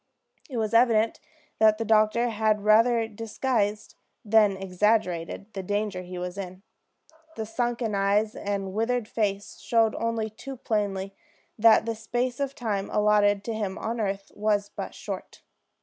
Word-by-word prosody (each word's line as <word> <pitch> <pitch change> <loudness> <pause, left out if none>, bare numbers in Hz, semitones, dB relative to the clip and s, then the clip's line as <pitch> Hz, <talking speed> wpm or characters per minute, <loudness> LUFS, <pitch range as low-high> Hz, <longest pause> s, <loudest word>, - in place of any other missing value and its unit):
It 255 - -5
was 220 0 -1
evident 230 -1 +3 0.4
that 215 -1 +5
the 225 - -3
doctor 220 +2 +3
had 215 -2 +1
rather 225 +2 +4
disguised 220 -1 -2 0.3
than 210 -2 +4
exaggerated 195 0 -1
the 195 - -4
danger 205 0 -2
he 180 0 -8
was 180 +2 -5
in. 185 0 -7 0.7
The 220 - -4
sunken 235 0 -2
eyes 200 +2 +2
and 195 -2 -3
withered 230 +1 0
face 200 -3 -2
showed 225 -2 +2
only 230 -1 -2
too 270 +5 -9
plainly 200 -4 -2 0.5
that 225 0 +6
the 230 - -1
space 240 +3 -2
of 275 -1 -2
time 210 -6 -2
allotted 210 -1 +3
to 230 - -3
him 205 -3 -3
on 230 +1 -3
earth 195 -1 -3
was 205 -1 0
but - - -6
short. - - -7
215 Hz, 150 wpm, -26 LUFS, 200-230 Hz, 0.7 s, that